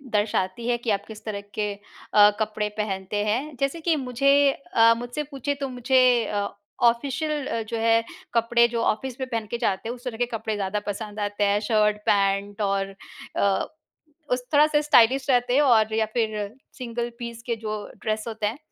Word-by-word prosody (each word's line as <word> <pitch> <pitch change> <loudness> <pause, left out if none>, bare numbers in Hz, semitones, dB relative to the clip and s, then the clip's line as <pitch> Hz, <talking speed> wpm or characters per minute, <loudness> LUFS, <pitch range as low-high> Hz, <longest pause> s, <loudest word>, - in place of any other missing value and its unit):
दर्शाती 205 +1 0
है 240 -1 +2
कि 235 -1 -5
आप 200 0 -1
किस 220 -1 -10
तरह 205 -2 -4
के 210 -1 -1
अ, 205 0 +3
कपड़े 215 -1 -1
पहनते 205 0 -2
हैं। 265 +7 -1
जैसे 275 +4 -1
कि 330 -1 +2
मुझे 270 0 +1 0.2
अ, 230 -4 +3
मुझसे 245 +5 -4
पूछे 280 +1 -2
तो 275 - -2
मुझे 255 +1 +2 0.2
अ, 205 -1 -1 0.4
ऑफिशियल 280 +5 +1
अ, 230 - -2
जो 225 +1 -4
है 230 0 +3 0.3
कपड़े 235 +1 +4
जो 235 -1 -2
ऑफिस 255 +4 -1
में 260 -1 -4
पहन 225 -2 -2
के 235 - -1
जाते 225 -1 -1
हैं 245 - -3
उस 245 - -16
तरह 230 -3 -4
के 245 - +1
कपड़े 220 -2 -3
ज़्यादा 200 +1 -2
पसंद 210 +1 -5
आते 205 0 -1
हैं, 205 0 +3
शर्ट-पैंट 205 -1 +1
और 195 -1 -1 0.4
अ, 200 -1 +2 0.7
उस 250 0 +1
थोड़ा-सा 295 0 +5
स्टाइलिश 270 -2 +4
रहते 245 -1 +3
हैं 290 - +5
और 220 -5 +4
या 220 0 +2
फिर 225 -3 +1 0.4
सिंगल 240 -1 -4
पीस 235 -1 -6
के 235 - 0
जो 215 -1 -5 0.3
ड्रेस 215 0 -1
होते 220 -2 -2
हैं 225 +6 -4
230 Hz, 185 wpm, -25 LUFS, 210-250 Hz, 0.7 s, थोड़ा-सा